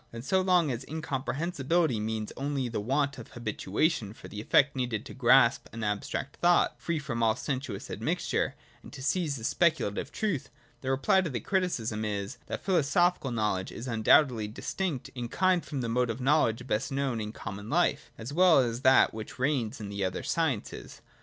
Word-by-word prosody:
And 115 +2 -8
so 190 +5 +2
long 180 -5 +3
as 120 +1 -4
incomprehensibility 155 - -1
means 110 0 -3
only 140 -2 -2
the 115 - -3
want 140 +6 0
of - - -9
habituation 110 - -1
for - - -12
the 105 - -7
effort 140 +5 +3
needed 120 -4 -2
to - - -9
grasp 125 -1 +4
an 115 -1 -6
abstract 105 +6 -3
thought, 175 0 +3
free 170 -1 -1
from 140 -6 -3
all 110 -1 +3
sensuous 130 -7 -4
admixture, - - -1 0.3
and - - -13
to 130 - -8
seize 150 -1 0
a 115 - -9
speculative 155 - +1
truth, 195 -11 -2 0.3
the 130 - -3
reply 135 +9 +3
to 175 - -2
the 125 -4 -3
criticism 115 - -1
is, 100 -2 -3
that - - -5
philosophical 175 -3 +2
knowledge 105 -5 -1
is 120 - -7
undoubtedly 115 0 +4
distinct 145 - -3
in 120 -2 -5
kind 185 +2 +2
from 140 -4 -4
the 120 - -2
mode 125 +1 +1
of 115 +2 -3
knowledge 125 -4 +2
best 125 +3 -1
known 135 -4 -1
in 105 0 -4
common 105 -1 -7
life, - - +1
as 120 +6 -7
well 180 0 +6
as 120 -3 +2
from - - -10
that 130 0 +5
which 110 -1 -7
reigns 125 -4 0
in 105 -2 -6
the 100 -1 -3
other 95 -1 -2
sciences. 155 -10 -2
130 Hz, 185 wpm, -29 LUFS, 110-155 Hz, 0.3 s, well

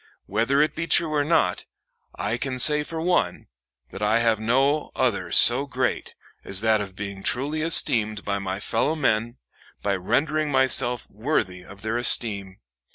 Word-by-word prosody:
Whether 115 +8 +1
it 155 - -2
be 165 +1 -5
true 165 -2 +3
or 145 -1 +1
not, 145 - 0 0.5
I 105 +4 -3
can 130 -2 -4
say 150 +3 +6
for 160 +2 -6
one, 160 - -1 0.4
that 95 - -9
I 105 +2 +2
have 115 -2 +1
no 135 +7 0
other 100 -9 -1
so 130 +4 +5
great 130 -1 -3 0.3
as 100 0 0
that 110 -1 +2
of 100 -2 -8
being 100 -1 -7
truly 145 +9 -2
esteemed 110 -9 +2
of 100 0 -2
my 95 0 -5
fellow 120 +9 -1
men, 120 -4 -1 0.5
by 100 - 0
rendering 150 - -1
myself 130 -3 +3
worthy 105 -6 -3
of 100 +2 -14
their 110 +2 -2
esteem. 100 -5 +1
120 Hz, 160 wpm, -23 LUFS, 100-145 Hz, 0.5 s, say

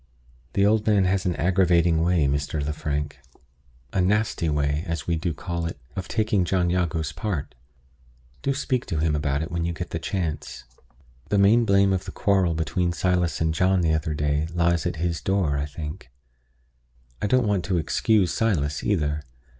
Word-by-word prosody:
The 100 - +3
old 110 +1 +2
man 105 -3 +4
has 95 0 +1
an 90 - 0
aggravating 85 -2 +3
way, 85 -3 +2
Mr. 70 +2 -1
Lefrank 75 0 -3 0.8
a 95 - +2
nasty 105 -3 +1
way, 75 +1 0
as 85 0 -3
we 85 - 0
do 85 +2 -2
call 85 +1 -4
it 85 - -6 0.2
of 95 -1 -4
taking 110 -3 +1
John 90 -1 +1
Jago's 85 -4 -1
part. 90 -10 -4 0.9
Do 140 - 0
speak 130 -2 -1
to 85 - -2
him 75 0 +1
about 70 0 0
it 80 - -6
when 85 0 -1
you 85 0 -1
get 90 +1 -6
the 80 - -2
chance. 80 -7 -4 0.7
The 105 - +2
main 110 +4 +5
blame 100 -1 +4
of 95 - -2
the - - -6
quarrel 95 -4 +1
between 85 +2 0
Silas 90 -1 0
and 80 0 +1
John 90 +3 +2
the 80 -2 +2
other 80 -1 -1
day 75 +1 0
lies 85 0 +2
at 90 - -3
his 85 0 -2
door, 95 -7 +1
as 75 +1 -3
I - - -21
think. 75 -4 -6 1.1
I - - +1
don't 130 +1 +3
want 100 -4 +1
to 95 -3 0
excuse 95 +3 +2
Silas, 75 -10 0
either. 75 -7 0
85 Hz, 185 wpm, -24 LUFS, 80-95 Hz, 1.1 s, main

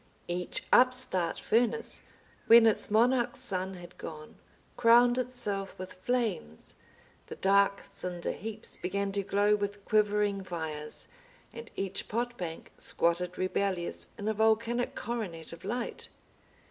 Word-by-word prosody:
Each 175 +1 -3
upstart 250 -9 +4
furnace, 230 0 +1 0.5
when 230 0 +9
its 220 - +3
monarch 240 +3 +3
sun 190 0 -3
had 175 0 -12
gone, 155 -1 -8 0.4
crowned 240 +1 +5
itself 215 -6 -3
with 185 0 -7
flames, 190 - -2 0.5
the - - -7
dark 200 0 +3
cinder 175 -1 -5
heaps 220 +1 -7
began 195 +2 -2
to 200 0 -1
glow 205 +2 +2
with 205 -1 -4
quivering 210 -2 +2
fires, 160 -4 -4 0.5
and 230 0 -9
each 195 -1 -3
pot 240 +2 -2
bank 170 -6 -6
squatted 175 +1 +1
rebellious 185 -1 -2
in 205 - -5
a 220 - +2
volcanic 225 +3 +1
coronet 185 -10 -5
of 170 - -12
light. 235 +5 -4
200 Hz, 125 wpm, -30 LUFS, 180-230 Hz, 0.5 s, when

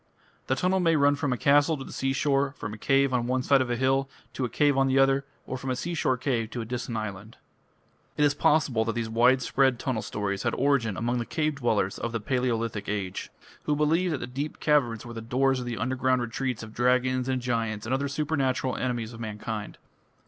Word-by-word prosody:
The 130 - +2
tunnel 180 +7 +1
may 165 -2 +3
run 145 -1 +4
from 145 -2 -1
a 125 - 0
castle 145 +5 +4
to 135 - -6
the - - -10
seashore, 135 +1 +1
from 105 - -5
a - - -7
cave 135 +1 +2
on 120 -1 +1
one 130 0 0
side 140 0 +4
of 130 - -1
a 120 - +1
hill 135 +2 +1 0.2
to 130 - -3
a - - -3
cave 145 +4 +2
on 135 0 +3
the 135 0 +2
other, 135 0 +3 0.2
or 130 - -5
from 135 - -5
a 130 - 0
seashore 140 -2 -1
cave 120 -4 -1
to 120 - -4
a - - -5
distant 120 0 -4
island. 110 0 -6 0.8
It 150 - +4
is 145 - +3
possible 145 -6 +2
that 115 - -1
these 115 -1 -2
widespread 130 +2 +3
tunnel 125 -3 -2
stories 100 -2 -3
had - - 0
origin 125 -7 +1
among 120 +1 0
the 120 - -2
cave 155 -1 0
dwellers 110 -7 0
of 115 - -3
the 115 - -1
Palaeolithic 115 -3 -1
Age, 95 -3 -3 0.4
who 150 - +1
believed 160 +3 +2
that 125 - -7
deep 145 +3 -4
caverns 125 -8 +1
were 120 - -8
the 115 - -6
doors 130 +3 +1
of 125 - -5
the 120 -1 -3
underground 130 +2 +1
retreats 120 0 -3
of 110 -1 -10
dragons 125 +1 +1
and 130 -1 0
giants 115 -4 -2
and 120 - -2
other 140 +2 0
supernatural 140 -3 -1
enemies 120 -2 -2
of 115 - -10
mankind. 105 -1 -5
130 Hz, 220 wpm, -27 LUFS, 115-135 Hz, 0.8 s, run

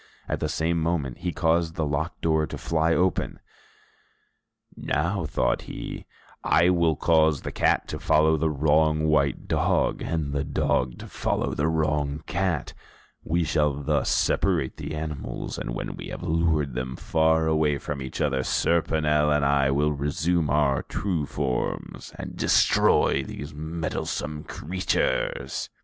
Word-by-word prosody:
At - - -2
the 75 - -1
same 80 +2 0
moment 80 -6 -1
he 90 - -2
caused 80 -1 +1
the 80 - -1
locked 75 +4 -3
door 80 -1 +2
to - - -6
fly 80 0 0
open. 90 +1 0 1.4
"Now," 85 +4 -1
thought - - 0
he, - - -7 0.4
"I 85 - +4
will 85 -3 +2
cause 80 -2 +3
the - - -4
cat - - +1
to - - -4
follow 80 +1 +3
the 80 +1 +1
wrong 75 +1 +2
white 70 -3 +1
dog, - - +1
and 75 -4 -2
the 70 0 0
dog 65 -3 0
to - - -9
follow - - -1
the 75 - 0
wrong 75 -2 0
cat; 90 -6 -1 0.5
we 85 +2 0
shall 75 -3 +1
thus 70 -1 0
separate 85 -9 +1
the 80 - -5
animals, 75 -2 -5
and - - -5
when - - -4
we - - -8
have - - -7
lured 80 -4 +1
them 65 +1 -4
far 80 +2 +2
away 80 -2 +2
from 70 0 -5
each 65 -1 -6
other, 65 -3 +1
Serponel 75 -1 +2
and 75 -1 +2
I 70 -1 +3
will 75 +2 +2
resume 75 +3 0
our 70 -3 +2
true 85 -7 -2
forms, 65 -4 -3
and - - -7
destroy - - +3
these 70 +3 -7
meddlesome 80 -1 -4
creatures." 95 +4 -2
75 Hz, 150 wpm, -25 LUFS, 70-80 Hz, 1.4 s, I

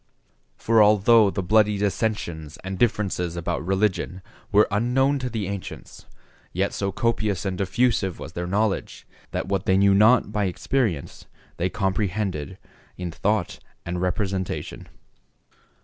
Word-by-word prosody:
For 115 -1 +3
although 105 +1 +5
the 95 - -3
bloody 105 +2 +3
dissensions 100 -7 -2
and 95 0 -5
differences 95 -7 0
about 85 -2 -3
religion 95 -1 -1 0.3
were 105 +1 +5
unknown 130 +7 +2
to 125 -1 -3
the 110 -5 -3
ancients, 100 -1 -8 0.5
yet - - 0
so 100 0 -2
copious 110 -3 -1
and 95 -1 -1
diffusive 100 -1 0
was 80 - -9
their 90 0 -4
knowledge, 100 +2 -1 0.2
that - - -3
what 95 -1 -2
they 95 - +4
knew 100 0 +5
not 105 +2 +5
by 105 -1 0
experience 95 - -2 0.3
they 90 +2 0
comprehended 95 -4 -2 0.4
in 90 -2 -4
thought - - -1 0.3
and 90 0 -3
representation. 95 0 -3
100 Hz, 135 wpm, -24 LUFS, 90-110 Hz, 0.5 s, although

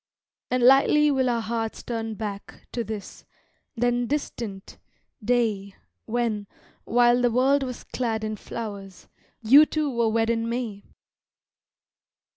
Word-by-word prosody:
And 250 -1 0
lightly 280 +3 +5
will 260 -2 +1
our 235 -1 0
hearts 225 0 -3
turn 225 -2 -4
back 205 -2 -7
To 235 - -2
this, 215 -2 -8 0.5
then 245 0 0
distant, 230 -8 -5 0.4
day 215 -4 0 0.3
When, 220 -3 -1 0.4
while 240 +1 +4
the 245 - +3
world 265 +4 +3
was 255 -2 -5
clad 225 -3 -3
in 215 0 -3
flowers, 200 -3 -8 0.4
You 280 +7 +7
two 305 -2 -1
were 235 -2 +1
wed 225 +1 +1
in 230 0 -1
May. 235 -4 -4
235 Hz, 125 wpm, -25 LUFS, 220-250 Hz, 0.5 s, You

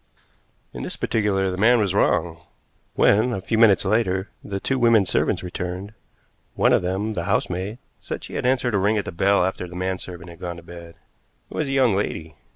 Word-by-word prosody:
In - - -6
this - - -4
particular 95 -3 0
the 90 - -4
man 120 +3 +5
was 100 -3 +1
wrong. 85 -4 +1 0.6
When, 110 +5 +4
a 95 - -2
few 110 +4 -1
minutes 105 -5 +5
later, 95 -2 +1
the 100 -1 -4
two 130 +6 -1
women 115 -4 +5
servants - - 0
returned, 90 +3 -5 0.6
one - - +3
of - - +4
them 95 +5 -2
the 85 -4 -3
housemaid 95 +5 -1 0.2
said - - -6
she - - -9
had - - -1
answered 125 -2 +1
a 100 - +2
ring 105 +3 +2
at 105 - -1
the - - -5
bell 95 +2 +2
after 95 -1 -3
the 90 - -11
man 95 +1 -2
servant 85 -1 -9
had 85 - -14
gone 85 -1 -5
to 85 - -12
bed. 85 -1 -11 0.5
It - - -8
was 155 - -1
a - - -3
young 130 -6 +3
lady. 80 -5 -3
95 Hz, 210 wpm, -23 LUFS, 90-110 Hz, 0.6 s, man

